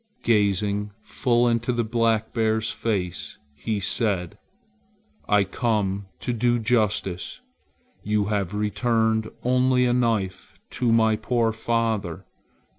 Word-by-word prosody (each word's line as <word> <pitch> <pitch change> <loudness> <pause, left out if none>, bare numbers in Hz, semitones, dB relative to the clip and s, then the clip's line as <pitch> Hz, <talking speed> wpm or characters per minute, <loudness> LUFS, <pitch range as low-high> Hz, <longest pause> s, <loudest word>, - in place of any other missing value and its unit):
Gazing 105 -1 +1
full 120 -2 +1
into 120 +1 +1
the 120 -1 0
black 115 -1 0
bear's 110 -1 +1
face, 95 -6 -3 0.2
he 100 +9 -3
said: 100 -1 -1 0.9
"I 105 -1 +5
come 100 -2 -1
to 125 - -2
do 120 +1 +2
justice. 110 - 0 0.6
You 105 -1 0
have 100 -2 -2
returned 110 +1 +1
only 125 0 +3
a 120 - +2
knife 110 -7 -1
to 120 -2 0
my 110 -1 +3
poor 115 -1 +1
father. 110 -6 -1
110 Hz, 115 wpm, -24 LUFS, 100-115 Hz, 0.9 s, I